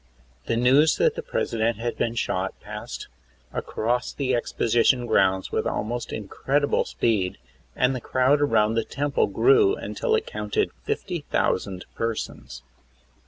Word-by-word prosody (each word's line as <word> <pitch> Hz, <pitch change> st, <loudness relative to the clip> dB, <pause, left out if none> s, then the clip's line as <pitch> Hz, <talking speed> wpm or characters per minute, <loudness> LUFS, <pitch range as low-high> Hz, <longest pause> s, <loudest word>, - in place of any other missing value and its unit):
The 115 Hz, -, +1 dB
news 135 Hz, +6 st, +4 dB
that -, -, +3 dB
the -, -, -5 dB
President 115 Hz, 0 st, -1 dB
had 120 Hz, +1 st, -3 dB
been 115 Hz, 0 st, -1 dB
shot 95 Hz, -4 st, -2 dB
passed -, -, -7 dB, 0.5 s
across 120 Hz, +3 st, -1 dB
the 130 Hz, -2 st, -1 dB
exposition 120 Hz, +1 st, +2 dB
grounds 95 Hz, -4 st, +2 dB
with -, -, 0 dB
almost 120 Hz, +3 st, -3 dB
incredible 135 Hz, +7 st, 0 dB
speed, 100 Hz, -6 st, 0 dB, 0.4 s
and 130 Hz, +1 st, +2 dB
the 125 Hz, -, -4 dB
crowd 130 Hz, +5 st, +2 dB
around 110 Hz, -6 st, +3 dB
the 115 Hz, 0 st, +1 dB
Temple 145 Hz, +4 st, 0 dB
grew 410 Hz, 0 st, +4 dB
until 460 Hz, -1 st, -1 dB
it 445 Hz, 0 st, -1 dB
counted 440 Hz, -3 st, -1 dB
50,000 145 Hz, -, -1 dB
persons. 115 Hz, -, -4 dB
120 Hz, 130 wpm, -25 LUFS, 110-145 Hz, 0.5 s, news